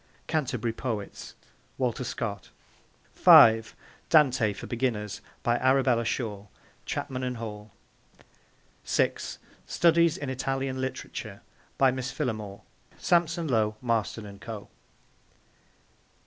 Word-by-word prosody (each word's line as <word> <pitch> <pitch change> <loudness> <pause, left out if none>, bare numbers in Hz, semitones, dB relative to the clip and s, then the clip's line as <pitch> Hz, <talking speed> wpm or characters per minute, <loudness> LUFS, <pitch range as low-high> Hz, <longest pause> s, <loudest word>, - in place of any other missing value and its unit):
'Canterbury 125 -7 -1
Poets.' 110 -4 -5 0.4
(Walter 130 -1 -1
Scott.) 105 -5 -4 0.6
(5) 115 0 +7 0.3
Dante 130 -8 +4
for 100 - -8
Beginners. 110 -5 -2 0.2
By 120 0 +2
Arabella 130 -3 +3
Shore. 105 -4 -3 0.4
(Chapman 130 -2 -3
and 125 -1 -3
Hall.) 105 -2 -7 1.1
(6) - - -1 0.3
Studies 170 -1 +3
in 145 - -5
Italian 135 0 -2
Literature. 130 0 -6 0.4
By 135 -1 +5
Miss 130 0 -4
Phillimore. 110 -9 -4 0.4
(Sampson 170 -1 +1
Low, 110 -5 +1
Marston 115 -2 -1
and 100 -1 -11
Co.) 110 -3 -8
120 Hz, 100 wpm, -27 LUFS, 110-135 Hz, 1.1 s, 5